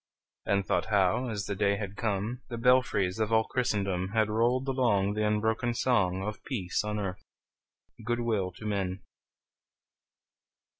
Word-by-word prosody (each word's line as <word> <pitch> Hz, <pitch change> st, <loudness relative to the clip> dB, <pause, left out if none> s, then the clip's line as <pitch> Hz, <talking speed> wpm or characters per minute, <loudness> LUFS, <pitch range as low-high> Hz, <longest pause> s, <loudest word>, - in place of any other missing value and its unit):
And 100 Hz, -1 st, +2 dB
thought -, -, +1 dB
how, 105 Hz, +4 st, +2 dB
as 105 Hz, -3 st, -3 dB
the 100 Hz, -, -2 dB
day 100 Hz, 0 st, +2 dB
had 100 Hz, -1 st, -5 dB
come, 110 Hz, +3 st, -2 dB
The 120 Hz, -, -4 dB
belfries 115 Hz, -6 st, +2 dB
of 110 Hz, 0 st, 0 dB
all 110 Hz, 0 st, +4 dB
Christendom 100 Hz, -6 st, -1 dB
Had 110 Hz, -1 st, +2 dB
rolled 120 Hz, +4 st, +1 dB
along 110 Hz, -7 st, +2 dB
The 105 Hz, 0 st, 0 dB
unbroken 110 Hz, +3 st, 0 dB
song 95 Hz, -7 st, +1 dB
Of 105 Hz, +1 st, -5 dB
peace 100 Hz, -11 st, -2 dB
on 105 Hz, 0 st, -2 dB
earth, 95 Hz, -3 st, -4 dB, 0.8 s
good 120 Hz, +2 st, -1 dB
will 105 Hz, -6 st, 0 dB
to 110 Hz, -, -11 dB
men! 95 Hz, -3 st, -2 dB
105 Hz, 150 wpm, -29 LUFS, 100-120 Hz, 0.8 s, all